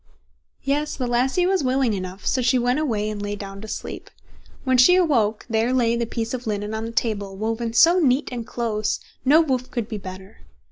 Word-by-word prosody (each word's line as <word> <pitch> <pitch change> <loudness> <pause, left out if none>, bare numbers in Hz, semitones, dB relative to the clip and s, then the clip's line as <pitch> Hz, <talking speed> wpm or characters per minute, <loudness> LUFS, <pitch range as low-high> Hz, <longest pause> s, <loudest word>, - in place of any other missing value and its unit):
Yes, 295 +2 -1
the 255 - -2
lassie 255 +8 +1
was 375 -3 +1
willing 255 -3 +1
enough; 185 0 -6
so 260 - +1
she 250 +1 +3
went 245 +3 +1
away 220 -9 -1
and 210 -1 -4
lay 205 0 -3
down 195 -1 -8
to 220 - -8
sleep. - - -6 0.5
When 260 -1 +2
she 305 +9 +7
awoke, 240 - +2
there 225 +1 +1
lay 235 -2 +2
the 235 -1 -1
piece 230 0 -3
of 250 -2 -5
linen 210 0 -2
on 220 0 -3
the 230 - -5
table, 205 -4 -2
woven 225 +2 -2
so 340 +9 +6
neat 275 -3 +2
and 235 -2 -5
close, 220 -3 -1 0.2
no 295 +5 +6
woof 260 -5 -1
could 235 -4 -3
be 215 -3 -5
better. 190 +1 -10
235 Hz, 205 wpm, -23 LUFS, 215-260 Hz, 0.5 s, she